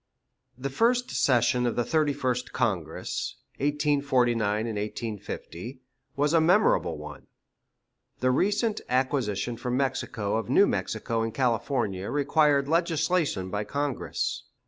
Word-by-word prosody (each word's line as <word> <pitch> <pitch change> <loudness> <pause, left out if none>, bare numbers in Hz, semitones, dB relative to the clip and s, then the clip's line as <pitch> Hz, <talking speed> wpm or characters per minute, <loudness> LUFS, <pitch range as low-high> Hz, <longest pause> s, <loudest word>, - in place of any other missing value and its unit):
The 135 +1 -4
first 240 - +2
session 125 -1 +2
of 120 - -1
the 120 - +1
Thirty 155 +2 +1
first 130 -3 -2
Congress 100 -10 -2 0.2
(1849 120 -7 0
'50) 120 +9 -7 0.4
was 145 +2 +1
a 165 - +5
memorable 185 +6 +3
one. - - -10 0.9
The 130 0 +2
recent 205 - +1
acquisition 125 -4 0
from 125 +1 -2
Mexico 120 -6 -1
of 110 -3 -4
New - - +6
Mexico 115 -1 -2
and 115 0 -1
California 115 -5 -1
required 145 -1 +2
legislation 165 - +1
by 105 0 -1
Congress. 140 +5 -2
130 Hz, 115 wpm, -27 LUFS, 115-145 Hz, 0.9 s, New